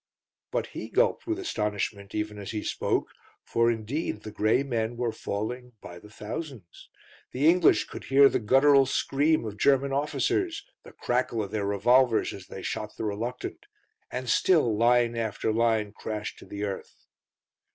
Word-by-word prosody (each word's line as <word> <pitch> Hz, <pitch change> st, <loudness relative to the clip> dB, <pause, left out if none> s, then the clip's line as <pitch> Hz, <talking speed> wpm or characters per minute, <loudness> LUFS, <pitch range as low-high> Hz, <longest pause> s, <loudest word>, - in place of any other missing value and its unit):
But -, -, -1 dB
he -, -, -6 dB
gulped -, -, +1 dB
with 335 Hz, 0 st, -1 dB
astonishment 105 Hz, -, -3 dB
even 105 Hz, -1 st, -3 dB
as 100 Hz, -, -7 dB
he 105 Hz, -1 st, -3 dB
spoke, -, -, -1 dB, 0.3 s
for, 115 Hz, 0 st, +2 dB
indeed, 115 Hz, 0 st, -3 dB
the 110 Hz, -, -7 dB
grey 110 Hz, +5 st, +2 dB
men 120 Hz, -3 st, -2 dB
were 120 Hz, -1 st, 0 dB
falling 125 Hz, +5 st, -5 dB
by 85 Hz, -2 st, -10 dB
the 105 Hz, -, -15 dB
thousands. 110 Hz, -, -8 dB, 0.4 s
The 140 Hz, +4 st, +2 dB
English 180 Hz, +2 st, +5 dB
could -, -, -9 dB
hear 140 Hz, +1 st, +6 dB
the -, -, 0 dB
guttural 135 Hz, +4 st, +5 dB
scream 145 Hz, +1 st, +1 dB
of 110 Hz, -, -3 dB
the 105 Hz, -, -15 dB
German 135 Hz, +3 st, +3 dB
officers, 340 Hz, -, -1 dB, 0.2 s
the -, -, -14 dB
crackle 120 Hz, -2 st, -1 dB
of 100 Hz, -, -7 dB
their 105 Hz, -2 st, -1 dB
revolvers 120 Hz, +4 st, +3 dB
as 95 Hz, -2 st, -10 dB
they 95 Hz, -, -8 dB
shot 110 Hz, -1 st, -4 dB
the -, -, -3 dB
reluctant; 115 Hz, +4 st, -4 dB, 0.4 s
and 125 Hz, 0 st, -5 dB
still 135 Hz, -, +3 dB
line 120 Hz, +1 st, +3 dB
after 110 Hz, -1 st, -1 dB
line 110 Hz, -2 st, +1 dB
crashed 105 Hz, 0 st, -6 dB
to -, -, -13 dB
the 100 Hz, 0 st, -6 dB
earth. 100 Hz, -2 st, -6 dB
115 Hz, 165 wpm, -27 LUFS, 105-135 Hz, 0.4 s, hear